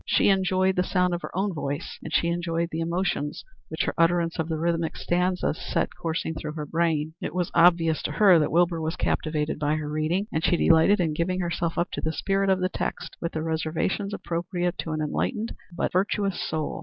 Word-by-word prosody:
She - - +4
enjoyed 190 -1 +2
the 180 - +3
sound 180 -1 +1
of 175 - -2
her - - -6
own 195 0 0
voice, 145 0 -4
and - - -6
she 170 - +2
enjoyed 170 -1 -1
the 160 - -3
emotions 165 -3 -2 0.2
which - - -1
her - - -1
utterance 170 0 +2
of 160 0 -1
the 160 - -1
rhythmic 165 0 -1
stanzas 180 -1 0
set - - -1
coursing 160 0 -2
through 155 -1 -5
her 155 -1 -5
brain. 160 -1 0
It 155 - -4
was 180 -2 -1
obvious 170 -2 +4
to 150 - -2
her 185 0 +6
that 150 - 0
Wilbur 170 0 +2
was 160 +2 -2
captivated 155 -3 -1
by 150 0 +1
her 155 -1 -3
reading, 155 +6 0
and 160 - -1
she 180 -2 +3
delighted 165 +6 +5
in 165 -4 +1
giving 185 +4 -1
herself 170 -1 -2
up 175 - 0
to - - -4
the 160 - -1
spirit 195 +2 0
of 190 -1 +2
the 185 - +1
text - - -4
with 170 - -3
the 155 - -2
reservations 165 +5 -1
appropriate 175 -1 -2
to 160 - -3
an 155 0 -2
enlightened 215 - -2 0.2
but 170 - -2
virtuous 195 +1 0
soul. 155 -1 -3
170 Hz, 215 wpm, -26 LUFS, 160-180 Hz, 0.2 s, her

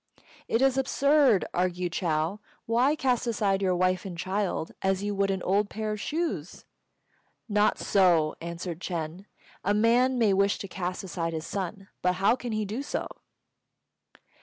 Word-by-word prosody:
"It 230 +3 +2
is 270 0 +3
absurd!" 275 -4 +3
argued 180 -1 -1
Chou. 165 +3 -1 0.3
"Why 245 +6 +3
cast 250 -4 0
aside 200 -4 +1
your 185 -2 +2
wife 185 0 +1
and 185 -3 -7
child 190 -2 -2
as 190 0 0
you 205 0 -1
would 200 0 +1
an 190 -1 -1
old 200 +2 +1
pair 215 0 -3
of 210 -1 -4
shoes?" 310 - -3 0.8
"Not 210 -1 +2
so," 175 -6 +3
answered 170 0 -5
Ch'êng; 170 +1 -4 0.4
"a 205 +2 +2
man 245 +4 +3
may 220 -4 +3
wish 200 +1 +2
to 195 - -6
cast 180 0 -4
aside 165 -3 -3
his 160 0 -4
son, 195 0 -4
but 180 0 +2
how 195 +5 +3
can 245 -2 -6
he 215 -1 -1
do 215 +7 -4
so?" 285 - -3
195 Hz, 160 wpm, -27 LUFS, 180-225 Hz, 0.8 s, is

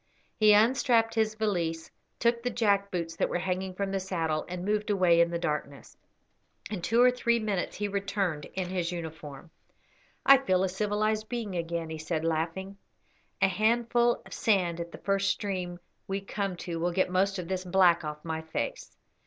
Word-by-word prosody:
He 215 -1 +6
unstrapped 230 +1 +4
his 220 -1 +1
valise, 175 -7 -2 0.3
took 235 0 +1
the 245 - -1
jack 200 -4 +1
boots 170 -3 -3
that - - +1
were - - 0
hanging 185 +1 -3
from 195 0 -2
the 195 - 0
saddle, 165 -5 -1
and 180 0 -5
moved 210 +1 0
away 180 -4 +4
in 170 - +3
the 170 - -2
darkness. 150 -4 -4 0.8
In 200 -5 -3
two 230 +7 +1
or 250 - +6
three 235 -1 +1
minutes 210 -5 -2
he 205 - -2
returned 195 -6 -2
in 185 -1 -2
his 180 -2 -2
uniform. 160 -2 -8 0.7
"I 275 -1 +8
feel 185 -8 +1
a 190 - +1
civilised 215 +2 -1
being 230 -5 -3
again," 165 -1 -3
he 160 - -5
said, 160 0 -2
laughing; 165 +5 -2 0.7
"a - - +7
handful 235 +3 +2
of - - -11
sand 180 -6 +1
at 170 0 -5
the - - -9
first 195 0 0
stream 185 -3 -2 0.3
we 195 +1 -2
come 195 -1 -3
to 170 -2 -3
will 175 +2 0
get 185 +1 +1
most 195 +2 +1
of 180 -2 -5
this 185 0 -2
black 180 -2 +4
off 150 0 -6
my 160 -1 -3
face. 160 - -5
190 Hz, 185 wpm, -29 LUFS, 170-210 Hz, 0.8 s, I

